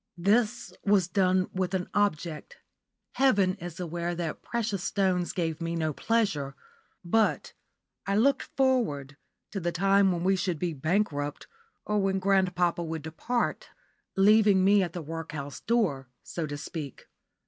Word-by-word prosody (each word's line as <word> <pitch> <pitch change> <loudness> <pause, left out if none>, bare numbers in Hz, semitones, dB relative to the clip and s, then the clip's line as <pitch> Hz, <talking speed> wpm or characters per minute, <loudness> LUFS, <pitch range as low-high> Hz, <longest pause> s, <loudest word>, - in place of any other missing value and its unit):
This 210 +2 +1
was 200 -3 +3
done 185 -1 +2
with 185 0 -1
an 180 -1 -2
object. 180 - -1 0.6
Heaven 205 -9 +4
is 175 -1 -8
aware 175 0 -3
that 165 -2 -4
precious 210 -6 -2
stones 185 -3 0
gave 165 -3 -2
me 165 0 -2
no 155 -2 -1
pleasure, 150 -11 0 0.5
but 220 +5 +1 0.5
I 200 - +1
looked 270 +7 +3 0.2
forward 225 - +1 0.4
to 200 - -3
the 175 -1 -1
time 195 +2 +3
when 175 -1 -2
we 190 +1 +3
should 180 -2 -1
be 170 +1 -2
bankrupt, 150 -1 -1 0.4
or 210 0 +1
when 195 -1 +1
grandpapa 180 -3 +1
would 160 -2 -5
depart, 235 +10 -2 0.5
leaving 205 -1 +5
me 200 +1 +5
at 175 -3 -2
the 175 - -5
workhouse 155 -3 -6
door, 180 - 0 0.2
so 165 -3 -4
to 145 0 -5
speak. 150 -2 -7
180 Hz, 145 wpm, -28 LUFS, 165-200 Hz, 0.6 s, leaving